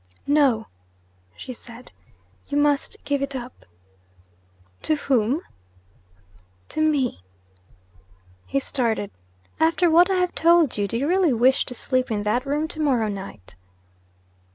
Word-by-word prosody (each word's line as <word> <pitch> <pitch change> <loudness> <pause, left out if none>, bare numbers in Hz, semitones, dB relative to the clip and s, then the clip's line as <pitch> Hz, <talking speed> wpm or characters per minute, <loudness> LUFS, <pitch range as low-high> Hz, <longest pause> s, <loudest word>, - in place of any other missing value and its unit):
'No,' 280 -6 +3 0.7
she 255 - -7
said. 235 +1 -14 0.6
'You 285 - -2
must 290 -1 +1
give 285 -1 0
it 275 0 -3
up.' 250 0 -8 1.1
'To 310 - +1
whom?' 265 0 +1 1.3
'To 310 - -2
me!' 285 - +1 1.3
He 275 - 0
started. 230 -7 -2 0.5
'After 330 +2 +3
what 350 +3 +6
I 380 - +2
have 360 -1 0
told 335 -4 +4
you, 205 -1 -1
do 230 - -2
you 275 +4 -1
really 360 -4 +3
wish 255 +3 +3
to 250 - -7
sleep 255 +1 0
in 210 -2 -1
that 245 +6 0
room 295 +3 0
to 325 - -7
morrow 255 -8 +1
night?' 190 - -8
275 Hz, 130 wpm, -23 LUFS, 235-310 Hz, 1.3 s, what